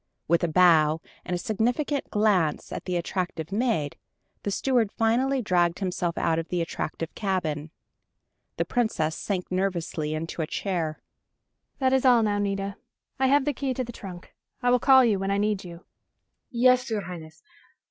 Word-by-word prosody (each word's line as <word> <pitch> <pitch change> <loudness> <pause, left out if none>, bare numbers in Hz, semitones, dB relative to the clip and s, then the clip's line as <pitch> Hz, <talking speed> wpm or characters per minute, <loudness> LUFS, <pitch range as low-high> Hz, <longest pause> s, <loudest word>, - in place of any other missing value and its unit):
With 170 +1 +2
a - - +3
bow, 160 -2 +5 0.2
and 180 - -2
a - - 0
significant 245 - -1
glance 200 -8 +1
at - - -5
the 180 - -2
attractive 175 -1 -3
maid, 205 - 0 0.4
the - - -3
steward 230 0 +1
finally 250 +4 +1
dragged 175 -3 +2
himself 180 -3 -2
out 165 -1 +1
of 165 - -5
the 180 - -2
attractive 165 -1 -4
cabin. 165 -7 -2 0.9
The - - 0
Princess 195 -10 0
sank 185 -2 -3
nervously 170 -5 -1
into 165 +1 -4
a 155 - -2
chair. 170 -5 -3 0.7
"That 260 -2 +2
is 265 - +3
all, 245 -3 +5
now, 205 -1 +1
Nita. 195 -1 -2 0.4
I 265 - +3
have 280 +1 +4
the 295 - +1
key 265 -1 -2
to 255 - -1
the 240 - -7
trunk. 185 -4 -10 0.3
I 245 - +4
will 250 - +4
call 265 0 +6
you 210 -4 +2
when 195 0 -2
I 200 - +1
need 205 -1 0
you." 170 -1 -11 0.6
"Yes, 250 +1 +3
your 220 -2 -1
Highness. 170 -4 -9
195 Hz, 170 wpm, -26 LUFS, 170-235 Hz, 0.9 s, call